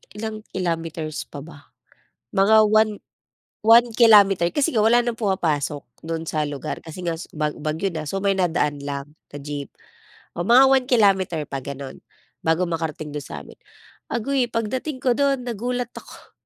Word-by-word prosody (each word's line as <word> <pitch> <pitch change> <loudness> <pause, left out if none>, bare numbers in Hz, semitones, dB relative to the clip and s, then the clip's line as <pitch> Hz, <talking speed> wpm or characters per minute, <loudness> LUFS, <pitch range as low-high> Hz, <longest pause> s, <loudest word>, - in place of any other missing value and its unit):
ilang 215 0 -5 0.2
kilometers 165 -3 -3
pa 145 -1 -9
ba? 150 -4 -14 0.7
Mga 215 +3 +5
1- 215 0 +4 0.7
1 230 +2 +6
kilometer 200 -7 +6
kasi 275 +7 0
nga 215 - +3
wala 240 +2 +4
ng 235 -1 -1
pumapasok 160 - -1 0.2
do'n 165 0 -4
sa 155 -1 -1
lugar, 140 -2 -5
kasi 175 +2 -9
nga 170 - 0
su - - -9
bag 150 -1 0
bagyo 160 +5 -2
na, 155 -2 -4
so 195 - -2
may 200 0 +2
na 185 -3 +1
daan 145 -3 -1
lang 140 +1 -6 0.2
na 145 - -9
jeep. 145 0 -6 0.7
O - - -1
mga 250 +4 +7
1 265 -2 +3
kilometer 190 -8 +3
pa 135 -1 -4
gano'n, 140 0 -8 0.4
bago 165 +3 +2
makarating 155 -2 -4
do'n 145 -1 -4
sa'min. - - -10 0.5
Aguy, 250 +2 0
pagdating 255 +5 -3
ko 250 -2 +3
do'n, 275 -3 +1
nagulat 245 +2 -3
ako. - - -13
185 Hz, 165 wpm, -22 LUFS, 155-225 Hz, 0.7 s, mga